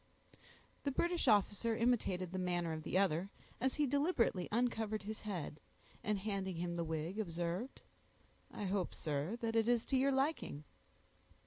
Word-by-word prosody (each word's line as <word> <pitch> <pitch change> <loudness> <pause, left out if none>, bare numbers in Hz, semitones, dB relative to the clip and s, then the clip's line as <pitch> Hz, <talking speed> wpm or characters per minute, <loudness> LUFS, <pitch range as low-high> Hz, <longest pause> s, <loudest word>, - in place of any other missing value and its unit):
The 285 - 0
British 340 +5 +1
officer 210 +2 +4
imitated 200 -7 +1
the 185 - -2
manner 175 -2 0
of 155 - -4
the 165 - 0
other, 190 -1 +2 0.3
as 260 +2 +1
he 300 - +3
deliberately 280 - +2
uncovered 220 -2 0
his 215 +1 -5
head, 180 -8 -4 0.4
and 210 0 +1
handing 195 -2 -2
him 170 +1 -2
the 170 - 0
wig, 160 +5 -3
observed, 175 +5 -2 0.7
"I - - -6
hope, 190 -2 -1
sir, 155 +8 -2
it 225 0 0
is 230 +1 +3
to 270 - +2
your 275 +2 +4
liking." 270 - 0
205 Hz, 150 wpm, -37 LUFS, 175-235 Hz, 0.7 s, officer